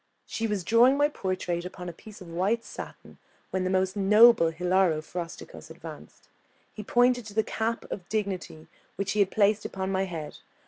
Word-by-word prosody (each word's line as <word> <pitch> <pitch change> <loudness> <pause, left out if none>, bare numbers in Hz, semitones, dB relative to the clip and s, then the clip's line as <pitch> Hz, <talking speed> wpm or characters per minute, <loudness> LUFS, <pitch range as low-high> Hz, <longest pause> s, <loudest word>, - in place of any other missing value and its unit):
She 225 - -3
was 205 -4 -2
drawing 240 +8 +5
my 290 +1 +3
portrait 185 - -3
upon 180 0 -8
a 175 - -5
piece 210 +4 -14
of 180 - -10
white 190 +8 -1
satin, - - -10 0.3
when 190 -1 -1
the 185 - 0
most 190 +1 +1
noble 210 -2 +6
Hilaro 180 0 +1
Frosticos 170 +2 -8
advanced. - - -11 0.5
He 215 - -7
pointed 245 +3 +3
to 205 - -11
the 220 - +3
cap 225 +2 -2
of 180 - -6
dignity 195 -7 -3 0.3
which 195 0 -2
he 210 - -1
had 200 -2 +4
placed 210 0 +2
upon 190 0 -4
my 190 0 0
head. 165 -5 -7
195 Hz, 180 wpm, -27 LUFS, 180-220 Hz, 0.5 s, noble